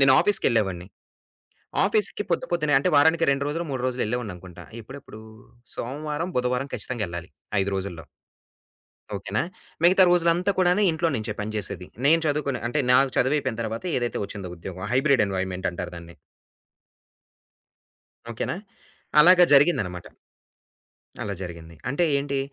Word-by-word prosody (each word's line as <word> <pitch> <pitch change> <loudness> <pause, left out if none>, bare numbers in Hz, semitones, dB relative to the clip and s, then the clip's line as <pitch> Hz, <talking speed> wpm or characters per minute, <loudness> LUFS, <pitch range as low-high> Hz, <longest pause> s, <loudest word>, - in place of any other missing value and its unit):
నేను 135 -1 +6
ఆఫీస్‌కెళ్ళేవాడిని. 100 - +1 1.0
ఆఫీస్‌కి 205 0 +1
పొద్దు 170 - 0
పొద్దున్నే 150 -4 +1
అంటే, 140 - 0
వారానికి 160 +3 +5
2 140 0 0
రోజులు, 165 +3 -2
3 130 -2 -3
రోజులు 125 0 -1
ఎళ్ళేవాడిననుకుంటా. 95 -7 -6 0.2
ఎప్పుడెప్పుడు 130 -2 -11 0.6
సోమవారం, 150 +7 -4
బుధవారం 125 +2 -1
ఖచ్చితంగా 120 -4 -3
ఎళ్ళాలి 85 +1 -7 0.3
5 100 - -2
రోజుల్లో. 90 -5 -5 1.1
ఓకేనా. 100 +2 -2 0.4
మిగతా 185 +2 +6
రోజులంతా 175 +2 +3
కూడాను 180 +3 +3
ఇంట్లో 165 +1 0
నుంచే 110 0 -3
పని 110 +1 -4
చేసేది. 95 -3 -4 0.2
నేను 165 +2 +5
చదువుకునే 145 -3 -1
అంటే, 150 +4 0
నాకు 135 +1 +5
చదువయిపోయిన 130 -3 +1
తరువాత 115 +7 -5
ఏదైతే 120 -1 -2
ఒచ్చిందో 100 -4 -7
ఉద్యోగం 95 +2 -7
హైబ్రిడ్ 135 -4 +4
ఎన్వైమెంట్ 95 -1 -2
అంటారు 85 - -6
దాన్ని. 85 0 -11 2.2
ఓకేనా. 115 +8 -3 0.6
అలాగా 180 +2 +8
జరిగిందనమాట. 110 - +3 1.2
అలా 100 -1 -3
జరిగింది. 85 -2 -8
అంటే 145 +7 +1
ఏంటి, 140 0 -2
125 Hz, 125 wpm, -25 LUFS, 100-150 Hz, 2.2 s, అలాగా